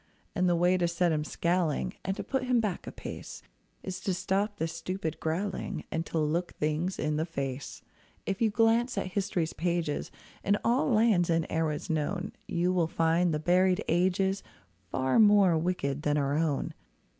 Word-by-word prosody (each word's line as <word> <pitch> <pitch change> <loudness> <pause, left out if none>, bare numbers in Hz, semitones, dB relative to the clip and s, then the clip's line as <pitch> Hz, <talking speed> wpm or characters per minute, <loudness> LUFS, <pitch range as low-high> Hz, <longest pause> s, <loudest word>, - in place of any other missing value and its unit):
And 185 -2 +2
the 175 - +3
way 180 +2 +3
to 175 -1 +1
set 170 0 +1
him 150 -1 0
scowling, 170 +2 0
And 190 +1 -2
to - - -3
put 265 -2 -1
him 250 -1 +3
back 210 -5 -2
a - - -4
pace, - - -8 0.4
Is 190 -1 -5
to 190 -4 -1
stop 200 +3 -1
this 160 0 -2
stupid 165 -1 -4
growling, 185 +5 -2
And 165 +1 -2
to - - -3
look 160 +3 0
things 155 +5 -1
in 150 0 -1
the 160 - 0
face. 140 -4 -5 0.4
If 195 +2 -3
you 225 - +4
glance 230 +3 +2
at 185 - -2
history's 185 -4 -1
pages, 170 -3 -1 0.3
In 200 +1 +3
all 245 +5 +2
lands 215 -7 +3
and 165 -1 +2
eras 160 -2 -1
known, 175 +6 -1 0.2
You 175 +2 +1
will 175 -3 +2
find 165 +2 +2
the 155 - +1
buried 180 +3 +3
ages 190 +3 +2 0.5
Far 130 +5 +1
more 205 -5 +6
wicked 160 -4 -1
than 150 -1 +1
our 140 0 +1
own. 155 -3 0
175 Hz, 180 wpm, -29 LUFS, 160-195 Hz, 0.5 s, more